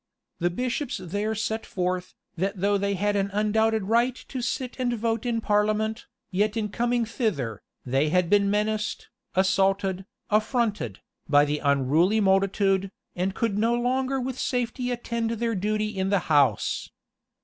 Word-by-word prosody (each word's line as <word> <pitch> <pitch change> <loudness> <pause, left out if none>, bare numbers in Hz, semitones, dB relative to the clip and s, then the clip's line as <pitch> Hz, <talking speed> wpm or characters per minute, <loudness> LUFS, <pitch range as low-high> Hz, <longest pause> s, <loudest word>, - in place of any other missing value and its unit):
The 175 - +2
bishops 250 - -2
there 205 +5 -2
set 220 +1 -2
forth, 180 -1 -3 0.2
that 190 +3 -2
though 200 +2 +2
they 200 0 0
had 205 +2 0
an 200 0 +1
undoubted 220 +1 +2
right 235 +5 +2
to 260 - -4
sit 250 +1 -3
and 245 -1 +1
vote 225 +1 -1
in 230 -1 0
parliament, 215 +1 0 0.2
yet 205 +4 +1
in 210 -1 -1
coming 240 +2 0
thither, 170 - -2 0.2
they 135 +4 +1
had 180 +1 +2
been 200 +1 +3
menaced, 210 +1 -1 0.3
assaulted, 190 0 +2 0.3
affronted, 215 - 0 0.3
by 145 0 +6
the 150 0 -1
unruly 145 +9 +3
multitude, 195 -1 +2 0.2
and 185 +2 -1
could 215 -3 0
no 230 +2 +2
longer 260 +2 0
with 255 0 -4
safety 245 0 -1
attend 235 -2 -2
their 230 0 -1
duty 215 +2 0
in 190 0 0
the 200 - +3 0.2
house. 145 -2 +2
210 Hz, 150 wpm, -26 LUFS, 190-230 Hz, 0.3 s, by